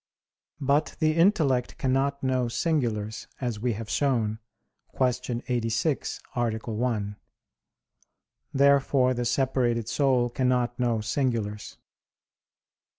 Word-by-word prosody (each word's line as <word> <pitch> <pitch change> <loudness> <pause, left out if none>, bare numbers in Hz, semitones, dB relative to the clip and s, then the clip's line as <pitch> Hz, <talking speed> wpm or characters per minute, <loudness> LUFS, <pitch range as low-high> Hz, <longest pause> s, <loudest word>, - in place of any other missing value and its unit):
But 145 +2 +1
the 155 -1 +2
intellect 160 - +2
cannot 135 +2 0
know 130 -2 +1
singulars, 115 -6 -1
as 120 -5 -3
we 120 +1 0
have 110 +1 -6
shown 115 -5 0 0.6
(Q. 125 -1 0
86, 120 +4 -1 0.2
A. 120 -1 +1
1). 110 -2 -2 1.4
Therefore 140 -2 +4
the 120 -1 -2
separated 120 -2 +1
soul 125 -2 +2
cannot 125 -1 0
know 120 -3 +1
singulars. 110 -3 -2
125 Hz, 95 wpm, -27 LUFS, 115-135 Hz, 1.4 s, Therefore